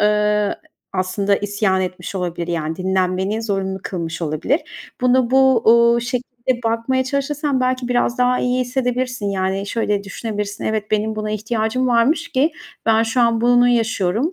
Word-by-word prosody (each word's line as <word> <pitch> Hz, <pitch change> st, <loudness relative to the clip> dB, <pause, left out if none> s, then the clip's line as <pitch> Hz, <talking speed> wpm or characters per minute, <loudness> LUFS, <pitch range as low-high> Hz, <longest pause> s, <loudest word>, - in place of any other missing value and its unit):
eee, 210 Hz, 0 st, +2 dB, 0.4 s
aslında 195 Hz, +2 st, 0 dB
isyan 205 Hz, -2 st, 0 dB
etmiş 185 Hz, 0 st, -5 dB
olabilir, 175 Hz, -2 st, -3 dB
yani, 160 Hz, -2 st, -2 dB
dinlenmeni 190 Hz, +3 st, 0 dB
zorunlu 195 Hz, -3 st, -2 dB
kılmış 170 Hz, -2 st, -4 dB
olabilir. 165 Hz, -, 0 dB, 0.4 s
Bunu 250 Hz, -1 st, +3 dB
bu, 265 Hz, -2 st, +4 dB
uuu, 235 Hz, 0 st, +5 dB
şekilde 245 Hz, 0 st, -3 dB
bakmaya 230 Hz, +3 st, 0 dB
çalışırsan 280 Hz, +1 st, -1 dB
belki 255 Hz, -1 st, 0 dB
biraz 245 Hz, 0 st, +1 dB
daha 250 Hz, 0 st, +3 dB
iyi 250 Hz, 0 st, +1 dB
hissedebilirsin. 250 Hz, -2 st, -1 dB
Yani, 195 Hz, 0 st, -1 dB
şöyle 205 Hz, -2 st, -1 dB
düşünebilirsin, 205 Hz, 0 st, -5 dB
"Evet, 215 Hz, -1 st, -2 dB
benim 215 Hz, +1 st, 0 dB
buna 215 Hz, 0 st, -3 dB
ihtiyacım 220 Hz, +3 st, -1 dB
varmış 255 Hz, +8 st, +2 dB
ki 300 Hz, +1 st, +1 dB, 0.3 s
ben 225 Hz, 0 st, +4 dB
şu 230 Hz, +3 st, 0 dB
an 230 Hz, -1 st, +3 dB
bunu 245 Hz, +1 st, +4 dB
yaşıyorum." 225 Hz, -, +1 dB
225 Hz, 145 wpm, -20 LUFS, 200-250 Hz, 0.4 s, uuu